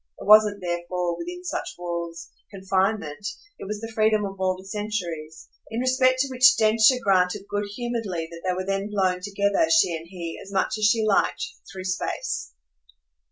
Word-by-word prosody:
It - - -8
wasn't 210 -1 +6
therefore, 175 0 -2
within 355 - -7
such 360 - -4
walls, 170 -1 -5 0.2
confinement, 190 -3 -1 0.4
it - - -7
was 210 +1 -4
the 225 0 -6
freedom 215 -1 +2
of 195 -1 -7
all 185 -1 +1
the 185 - -13
centuries: 180 -7 -5 0.2
in 225 - -3
respect 255 0 +3
to 275 - 0
which 255 -1 +5
Densher 220 +3 +5
granted 190 0 +2
good 205 0 -2
humouredly 225 -9 -3
that 170 0 -9
they 185 -1 0
were 185 0 -3
then 195 +1 -2
blown 190 -3 0
together, 200 - +1
she 255 - +4
and 165 +1 -8
he, 170 -2 -7
as 195 - -12
much 205 +3 0
as 215 - +2
she 220 +1 +3
liked, 210 - +1 0.3
through 190 -1 -7
space. 185 -1 -3
195 Hz, 175 wpm, -25 LUFS, 180-215 Hz, 0.4 s, wasn't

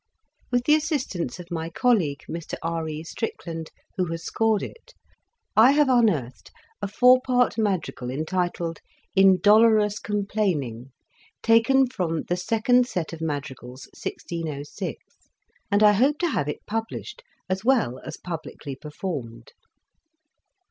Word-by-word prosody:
With 245 -1 +1
the 300 - +5
assistance 265 - -1
of 175 0 -10
my 165 -1 -3
colleague, 170 - +1
Mr 165 0 -5
R. 165 -1 -2
E. 155 0 -5
Strickland, 165 -3 -5 0.3
who 185 - +1
has 165 -1 -5
scored 220 -2 +1
it, - - -10 0.6
I 235 +5 +7
have 290 -2 +4
un 240 -3 +5
earthed 130 - -4 0.3
a 200 - -1
four 250 +5 +5
part 250 -2 +2
madrigal 190 - -1
entitled 165 +3 -2 0.4
"In 190 -1 +6
dolorous 210 -1 +5
complaining," 185 - -2 0.5
taken 230 +4 +5
from 170 -9 -2
"The 175 - -1
Second 230 +6 +2
Set 175 -9 -3
of 165 - -8
Madrigals," 135 -4 -5
1606, 155 -4 -5 0.7
and 205 +1 +3
I 210 - +8
hope 265 +8 +3
to 345 +1 0
have 145 - -1
it - - -6
published, 225 - -5 0.3
as 190 +1 -2
well 230 - +2
as - - -7
publicly 160 -5 -7
performed. 135 -6 -6
185 Hz, 135 wpm, -25 LUFS, 160-225 Hz, 0.7 s, I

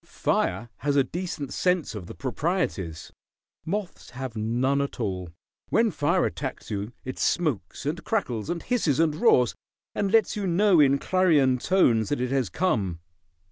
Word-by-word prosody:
Fire 105 +6 -1
has 145 0 -1
a 140 - +5
decent 165 -3 -5
sense 180 -4 +1
of 100 -5 -7
the - - -9
proprieties. 130 - -2 0.5
Moths 200 +2 -4
have 125 -2 -6
none 120 +6 +1
at 140 -1 -4
all. 95 -5 -3 0.4
When - - +3
fire - - +1
attacks - - -5
you 105 +3 -4
it 130 - -6
smokes, 140 - -1
and 160 +4 -2
crackles, 130 - -2
and 170 -1 -3
hisses, 180 - +1
and 165 -2 +3
roars, 130 - +4 0.4
and 200 -2 -1
lets 225 -1 +3
you 205 -2 -2
know 185 0 +4
in 140 -1 +5
clarion 150 -8 +3
tones 120 - +3
that 145 - -1
it 125 0 -1
has 130 -7 +1
come. 100 - 0
140 Hz, 160 wpm, -26 LUFS, 115-175 Hz, 0.5 s, a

